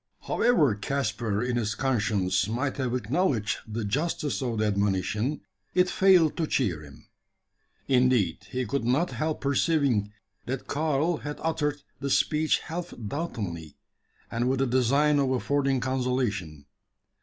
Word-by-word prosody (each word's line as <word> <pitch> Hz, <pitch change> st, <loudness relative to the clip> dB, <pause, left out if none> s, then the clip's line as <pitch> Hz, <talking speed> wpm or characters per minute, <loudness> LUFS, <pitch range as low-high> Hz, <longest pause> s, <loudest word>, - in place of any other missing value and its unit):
However 225 Hz, -, +3 dB
Caspar 110 Hz, -2 st, -2 dB
in 125 Hz, -1 st, -1 dB
his 105 Hz, -3 st, -1 dB
conscience 105 Hz, -8 st, +1 dB
might 130 Hz, +5 st, -2 dB
have 125 Hz, -2 st, -1 dB
acknowledged 125 Hz, -, 0 dB
the 110 Hz, 0 st, -3 dB
justice 145 Hz, +5 st, -1 dB
of 120 Hz, -4 st, -2 dB
the 110 Hz, -, +1 dB
admonition, 105 Hz, -, 0 dB, 0.3 s
it 180 Hz, 0 st, +3 dB
failed 185 Hz, -5 st, +5 dB
to 160 Hz, -, 0 dB
cheer 95 Hz, -, 0 dB
him. 70 Hz, -3 st, -14 dB, 0.8 s
Indeed, 125 Hz, -, +2 dB
he 130 Hz, -1 st, -2 dB
could 130 Hz, +3 st, -2 dB
not 135 Hz, +9 st, +1 dB
help 155 Hz, 0 st, -2 dB
perceiving, 140 Hz, -7 st, +1 dB, 0.4 s
that 130 Hz, +1 st, -3 dB
Karl 155 Hz, +2 st, 0 dB
had 150 Hz, 0 st, -6 dB
uttered 150 Hz, -3 st, -1 dB, 0.2 s
the 140 Hz, +1 st, -3 dB
speech 155 Hz, +3 st, +2 dB
half 175 Hz, +2 st, -6 dB
doubtingly, 100 Hz, -, -5 dB, 0.5 s
and 120 Hz, +2 st, 0 dB
with 135 Hz, -, +1 dB
the 135 Hz, -, +2 dB
design 140 Hz, +4 st, +3 dB
of 135 Hz, -2 st, +2 dB
affording 135 Hz, +1 st, +1 dB
consolation. 125 Hz, -, -2 dB
130 Hz, 135 wpm, -27 LUFS, 105-145 Hz, 0.8 s, failed